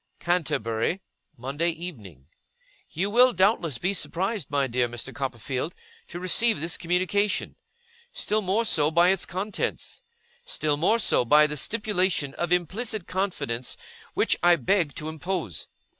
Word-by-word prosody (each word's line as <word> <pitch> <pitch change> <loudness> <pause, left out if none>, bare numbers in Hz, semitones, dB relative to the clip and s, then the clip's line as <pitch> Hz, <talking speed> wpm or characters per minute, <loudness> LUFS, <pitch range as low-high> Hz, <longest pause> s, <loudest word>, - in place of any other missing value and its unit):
'CANTERBURY, 155 - 0 0.4
Monday 140 +7 -1
Evening. 120 - -8 0.6
'You 190 +6 -2
will 250 +3 +6
doubtless 185 - +2
be 185 +8 0
surprised, 190 - -2
my 140 -1 +1
dear 125 -1 0
Mr. 120 0 -6
Copperfield, 135 +3 -3 0.3
to 175 - -7
receive 200 +3 +3
this 165 +2 -1
communication. 185 +4 0 0.6
Still 215 +1 -1
more 205 +4 +1
so, 150 -7 +3
by 170 +3 +4
its 190 -1 +1
contents. 195 +4 -3 0.4
Still 155 - -1
more 180 +10 +3
so, 225 - +3
by 150 +5 +6
the 150 0 -2
stipulation 185 - 0
of 175 +2 -3
implicit 190 +4 0
confidence 180 -11 -2 0.4
which - - +3
I 175 0 +6
beg 175 -4 +1
to 155 -2 -5
impose. 160 - -4
170 Hz, 135 wpm, -26 LUFS, 145-195 Hz, 0.6 s, will